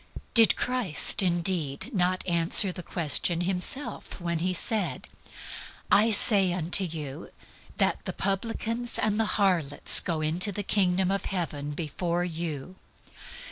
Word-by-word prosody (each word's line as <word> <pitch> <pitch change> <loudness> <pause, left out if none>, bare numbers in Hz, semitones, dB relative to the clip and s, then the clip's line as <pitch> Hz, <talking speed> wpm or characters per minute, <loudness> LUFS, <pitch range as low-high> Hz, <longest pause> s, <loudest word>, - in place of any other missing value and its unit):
Did 225 -2 +6
Christ 245 -12 0
indeed 175 - -2
not 185 -1 -1
answer 170 +2 +3
the 180 - -8
question 170 0 -1
Himself 190 +11 -3
when 170 -2 -4
He 180 +3 -1
said, 185 - -2 0.9
"I 215 +3 +4
say 200 -3 +3
unto 180 +2 +1
you 155 -3 -7 0.5
that - - -1
the - - -4
publicans 230 +4 -2
and 215 0 -1
the 225 - +1
harlots 180 -8 +6
go 165 -3 -4
into 170 +6 +1
the 205 +1 -4
Kingdom 190 -2 0
of 195 -1 -3
Heaven 150 -6 -4
before 170 +3 -4
you"? 170 0 -6
180 Hz, 130 wpm, -26 LUFS, 165-200 Hz, 0.9 s, Did